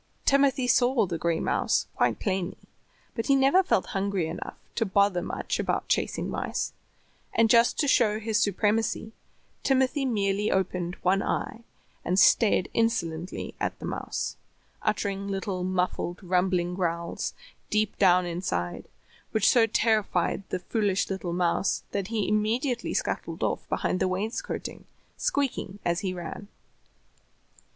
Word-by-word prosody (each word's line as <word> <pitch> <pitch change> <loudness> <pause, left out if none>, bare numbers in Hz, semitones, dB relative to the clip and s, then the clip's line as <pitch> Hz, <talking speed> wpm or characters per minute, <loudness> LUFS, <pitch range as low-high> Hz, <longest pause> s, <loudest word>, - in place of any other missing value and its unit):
Timothy 275 -1 +3
saw 245 -2 +4
the 170 -3 -4
gray 170 -1 0
mouse - - +1
quite - - +1
plainly, 190 -2 -2 0.6
but 230 - -3
he 275 - +5
never 275 +7 +5
felt 275 - +1
hungry 195 -3 0
enough 160 +2 -6 0.2
to 230 - +1
bother 200 -2 +2
much - - -3
about - - -1
chasing - - 0
mice, - - -3 0.6
and, 225 -1 +4
just 235 0 +5
to 290 - +1
show 215 -5 +3
his 220 0 0
supremacy, 215 +2 +1 0.5
Timothy 270 +1 +2
merely 205 -3 +1
opened 180 -2 -1
one 190 +2 +3
eye 225 - -2 0.4
and 180 +2 0
stared 200 -1 +5
insolently 180 -7 -1
at - - -2
the - - -8
mouse, - - -3 0.4
uttering 200 -2 -1
little 195 -2 -3
muffled, 180 0 -1
rumbling 180 -1 +1
growls 170 -2 -2 0.3
deep 215 -1 +1
down 180 -2 +5
inside, 170 - -3 0.4
which 220 -2 +2
so 235 -3 +5
terrified 215 -5 +1
the - - -1
foolish 200 +1 0
little 190 -2 -3
mouse 175 +2 +1
that 200 -2 -2
he 220 -2 -1
immediately 230 +5 0
scuttled - - -2
off - - -2
behind 185 - 0
the 190 - +2
wainscoting, 200 +5 -4 0.3
squeaking 270 -8 -1
as 170 0 +1
he 195 -3 -2
ran. 180 +3 -7
200 Hz, 135 wpm, -27 LUFS, 180-225 Hz, 0.6 s, he